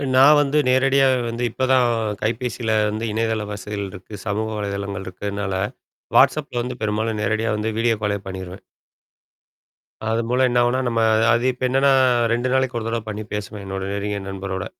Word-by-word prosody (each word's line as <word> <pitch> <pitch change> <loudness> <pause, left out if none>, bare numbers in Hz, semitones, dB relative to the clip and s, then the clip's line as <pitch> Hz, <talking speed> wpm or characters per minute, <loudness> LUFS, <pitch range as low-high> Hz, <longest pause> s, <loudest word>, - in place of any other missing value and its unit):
நான் 140 +3 +7
வந்து 145 +1 0
நேரடியா 135 +1 +4 0.2
வந்து 115 +1 -4
இப்பதான் 130 0 +2 0.4
கைபேசியில 115 0 -1
வந்து 110 +2 -3
இணையதள 110 0 -1
வசதிகள் 100 0 -5
இருக்கு, 100 +2 -12
சமூக 110 +2 -1
வலைதளங்கள் 100 -1 -4
இருக்கறனால, 100 +1 -4 0.6
WhatsAppல 140 -5 +3
வந்து 125 0 -6
பெரும்பாலும் 110 +1 -1
நேரடியா 110 +2 0
வந்து 110 +1 -1
வீடியோ 115 0 +2
காலே 105 -1 0
பண்ணிருவேன். 95 0 -7 1.5
அதன் 115 +1 0
மூலம் 130 +1 +3
என்ன 120 - 0
ஆகும்னா, 120 +2 +1
நம்ம 115 -1 0 0.3
அது 120 +2 +2
இப்ப 125 - -9
என்னன்னா 135 +2 +3 0.4
2 120 +2 0
நாளைக்கு 130 -2 +1
ஒரு 110 - -6
தடவ 115 0 -1
பண்ணி 110 0 -4
பேசுவேன். 105 0 -5
என்னோட 95 0 -4
நெருங்கியே 100 0 -2
நண்பரோட. 95 -1 -4
110 Hz, 155 wpm, -22 LUFS, 100-125 Hz, 1.5 s, நான்